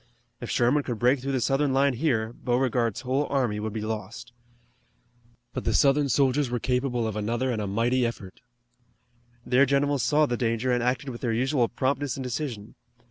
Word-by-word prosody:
If - - -7
Sherman 125 +5 +2
could 120 -4 -4
break 125 +4 +3
through 135 +2 -3
the 130 - +1
Southern 135 +2 +1
line 135 0 +3
here 120 -5 0
Beauregard's 120 -2 0
whole 135 +3 0
army 125 -7 0
would 110 +1 -3
be 110 0 -4
lost. 110 +2 -6 1.2
But - - -4
the - - 0
Southern 140 0 +3
soldiers 135 +1 +2
were 120 - -1
capable 125 -1 -1
of 110 - -4
another 120 +5 -1
and 110 -3 -2
a 105 - -3
mighty 120 +6 +1
effort. 110 -5 -5 1.0
Their 130 +2 +4
generals 140 0 +1
saw 150 +6 +3
the 120 -4 -2
danger 115 +1 0
and 120 0 +1
acted 125 +3 -1
with 120 -2 -8
their 120 - -1
usual 130 +1 +1
promptness 135 +1 -1
and 135 - -4
decision. 125 -4 -5
125 Hz, 185 wpm, -26 LUFS, 115-135 Hz, 1.2 s, Their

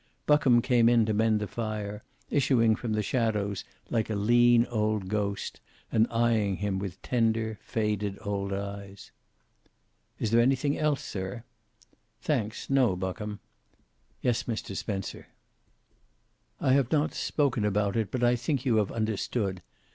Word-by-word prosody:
Buckham 130 -5 +4
came 120 -3 +4
in 120 -2 +4
to 110 - 0
mend 110 0 +2
the 105 - -2
fire, 105 -2 -4 0.3
issuing 120 -5 +3
from 110 0 -3
the 105 0 0
shadows 105 -4 -1 0.3
like 115 -1 0
a 110 - -1
lean 120 +3 +5
old 105 -4 -1
ghost 100 -1 -2 0.3
and 110 +1 +3
eyeing 115 -4 +2
him 100 0 -2
with 95 -3 -6
tender, 115 -2 0
faded 105 -2 -2
old 100 -1 -3
eyes. 100 0 -6 1.1
"Is 110 - -2
there 115 +1 +5
anything 135 +3 +2
else, 150 -3 0
sir?" 95 +4 -5 0.8
"Thanks, 115 -8 -2
no. 130 -8 +3
Buckham." 105 +3 -4 0.8
"Yes, 120 -2 +1
Mr. 110 -4 -4
Spencer." 100 -2 -4 1.3
"I 130 - +3
have 135 -3 +2
not 155 0 +2
spoken 135 -7 0
about 105 0 +1
it, 110 -4 0
but 125 +2 -2
I 120 0 +4
think 130 +2 -2
you 120 -4 +3
have 105 -2 +1
understood. 110 -3 -2
110 Hz, 140 wpm, -28 LUFS, 100-120 Hz, 1.3 s, lean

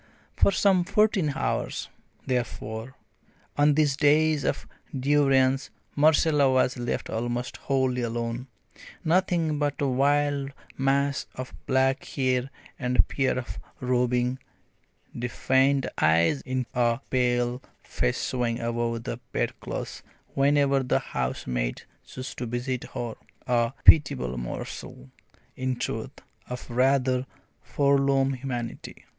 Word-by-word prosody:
For - - +4
some 190 -3 +3
fourteen 195 -5 +2
hours, - - -2 0.4
therefore, 120 -1 -3 0.6
on 145 0 +4
these 145 -3 +3
days 150 +1 +3
of - - -1 0.3
durance 135 -1 +3 0.3
Marcella 150 -1 +4
was 130 -1 +2
left 120 -1 -3
almost 120 +2 -3
wholly 130 -2 0
alone, 115 +2 -3 0.6
nothing 165 -3 +1
but 145 -1 -1
a 145 - +1
wild 140 +1 +1 0.2
mass 140 +1 +1
of 130 0 -7
black 130 0 +2
hair 130 -1 -1 0.3
and 125 -2 -1
a - - +7
pair 135 -2 0
of 130 - -5 0.2
roving, 125 0 +1 0.8
defiant 130 +3 +2
eyes 85 - +3
in 130 0 -1
a 120 -1 +2
pale 125 0 +1 0.2
face 60 - -1
showing 120 -2 -1
above 115 0 -2
the - - -5
bedclothes - - -4 0.3
whenever 140 0 +3
the 125 - +1
housemaid 60 -1 -3 0.2
chose 130 0 -7
to 125 - -5
visit 120 +2 -3
her 120 -2 -3 0.3
a 120 -1 +1
pitiable 65 - +6
morsel, 60 +1 -7 0.4
in 130 0 -1
truth, - - -5 0.3
of 125 0 -6
rather 130 +1 +2 0.3
forlorn 140 -1 +2
humanity. 125 -3 -6
130 Hz, 115 wpm, -26 LUFS, 120-140 Hz, 0.8 s, a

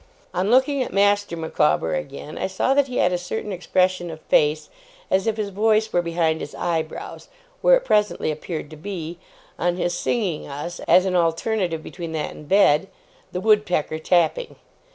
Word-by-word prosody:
On 190 +3 0
looking 265 +3 +3
at 255 - -3
Master 205 -2 +2
Micawber 80 - +1
again, 135 - -5
I - - -2
saw 190 +7 +1
that 280 0 +3
he 250 - -4
had 180 0 +3
a 180 - 0
certain 210 +4 -4
expression 185 0 0
of 160 -1 -8
face, 150 +1 +2 0.4
as 190 +3 +2
if 220 -1 0
his 210 -2 -2
voice 215 +2 +2
were 175 - +3
behind 165 -2 0
his 145 - -7
eyebrows; 160 -2 -4 0.3
where - - +6
it - - -1
presently 210 - +1
appeared 155 0 -6
to - - -8
be, 170 -1 -6 0.4
on 175 0 +1
his 175 -1 -1
singing 190 -9 -1
us 150 +5 -6
(as 185 - +6
an 185 -1 0
alternative 170 0 0
between 170 -3 -7
that 155 -1 -2
and 150 - -12
bed) 195 -3 +4 0.4
'The 180 - -3
Wood 210 0 +4
Pecker 155 -3 -1
tapping'. 180 - +1
180 Hz, 180 wpm, -23 LUFS, 160-205 Hz, 0.4 s, where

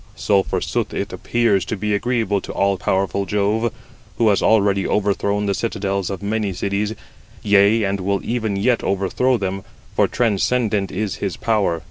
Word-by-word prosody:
So 100 -2 +2
forsooth - - -2
it - - -3
appears 115 -5 +1
to 110 - -3
be 105 +2 -1
agreeable 105 -2 0
to - - -7
all 100 0 +2
powerful 95 +1 0
Jove, 105 +4 +1 0.5
who 115 -2 +4
has 100 - +2
already 100 -3 +3
overthrown 100 0 0
the 100 - +1
citadels 100 -4 -2
of 100 0 -5
many 105 -1 -1
cities, 100 +4 -2 0.5
yea, 105 +2 +4
and 100 0 -1
will 100 +1 0
even 110 -4 -1
yet 115 +4 +1
overthrow 100 +7 +1
them, 95 -1 -3 0.3
for - - +3
transcendent 110 -2 0
is 100 0 -3
his 100 -3 -3
power. 105 -7 +1
100 Hz, 160 wpm, -20 LUFS, 100-110 Hz, 0.5 s, who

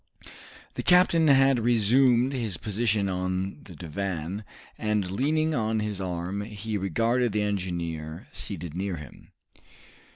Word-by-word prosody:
The - - -3
captain 180 -3 +5
had 135 -2 +5
resumed 120 +3 +3
his 115 -9 -2
position 105 -1 0
on 95 +1 -2
the 90 - -13
divan, 90 +3 -4 0.3
and 105 -4 -1
leaning 155 +9 +1
on 110 -4 0
his 105 -2 -3
arm, 90 +2 -3
he 105 0 -5
regarded 115 +5 +1
the 105 -1 +1
engineer, 85 -6 -3
seated 85 -4 -6
near 95 +1 -2
him. 75 -5 -12
105 Hz, 125 wpm, -27 LUFS, 90-120 Hz, 0.3 s, captain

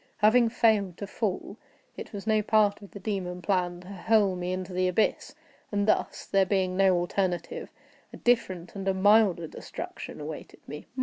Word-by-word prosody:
Having 230 +3 +5
failed 215 -6 +2
to 200 - -5
fall, 205 0 -3 0.4
it - - -8
was 200 -1 -7
no 215 -1 +3
part 210 -1 +2
of 200 - -12
the 200 - -10
demon 185 -3 -3
plan 175 -1 -1
to 180 - -14
hurl 200 0 +2
me 180 0 -3
into 185 0 -4
the 185 0 +1
abyss; 180 +4 0 0.4
and 205 0 0
thus 215 - 0
(there 195 -1 +3
being 190 -1 0
no 190 -1 +4
alternative) 175 0 -2 0.4
a - - -10
different 185 -8 0
and 195 -1 -6
a 190 - +2
milder 200 -3 +4
destruction 155 - -8
awaited 150 +1 -9
me. 150 - -8
195 Hz, 175 wpm, -28 LUFS, 180-210 Hz, 0.4 s, Having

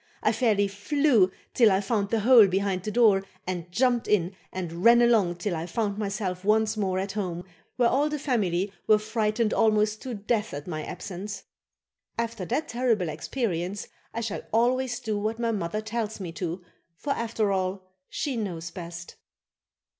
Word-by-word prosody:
I 215 - +4
fairly 220 -3 +2
flew 210 0 +2 0.2
till 230 -4 +5
I 190 - +3
found 200 0 -1
the 225 -1 +1
hole 235 -2 +8
behind 190 0 0
the 215 - -4
door 210 -4 +4 0.2
and 175 -2 -4
jumped 245 +3 +2
in 190 -2 +1 0.2
and 175 -1 -5
ran 235 +1 +7
along 220 -7 +4
till 175 +1 -2
I 165 +1 -4
found 210 -1 -2
myself 195 -3 -3
once 220 +1 +2
more 190 -3 0
at 190 +1 -2
home, 180 -4 -3 0.3
where 245 -2 +3
all 290 +3 +2
the 300 - -2
family 200 - 0
were 215 - +6
frightened 215 +1 0
almost 215 -1 +2
to 255 -3 -5
death 210 -2 -1
at 145 - -6
my 155 -3 -4
absence. 200 +4 -6 0.7
After 230 -4 -2
that 300 - -1
terrible 230 -8 +1
experience 180 - -3 0.2
I 230 - -3
shall 215 -2 -3
always 245 +2 +1
do 215 -2 -2
what 215 +2 -2
my 230 -1 0
mother 205 0 -2
tells 220 -1 -3
me 180 -4 -5
to, 175 +2 -4 0.3
for 280 +7 -1
after 225 -4 -1
all, 190 0 -1 0.3
she 280 -4 -2
knows 175 -6 -4
best. 170 -1 -8
210 Hz, 170 wpm, -27 LUFS, 185-230 Hz, 0.7 s, hole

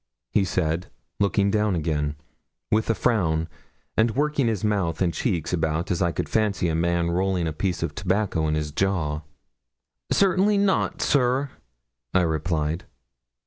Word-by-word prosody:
he 100 - +3
said, 85 -2 -1 0.3
looking 100 0 +2
down 105 -2 +2
again, 75 -2 -1 0.6
with 110 +1 +2
a 115 - +3
frown, 80 -7 +1 0.5
and 110 0 +2
working 145 -2 +1
his 110 -3 -1
mouth 100 -6 0
and 90 -3 +1
cheeks 85 -2 -1
about 80 +1 0
as 90 - 0
I 85 -2 +2
could - - -3
fancy 105 -5 +1
a - - 0
man 85 +1 +1
rolling 90 0 0
a 80 - -2
piece 90 +1 -2
of 85 - -2
tobacco 95 -4 0
in 75 - +1
his 75 -1 -2
jaw. 80 -4 0 0.9
'Certainly 195 +2 +3
not, 200 -1 +1
sir,' 130 0 +2 0.6
I 95 - +6
replied. 80 0 -1
90 Hz, 150 wpm, -25 LUFS, 80-110 Hz, 0.9 s, I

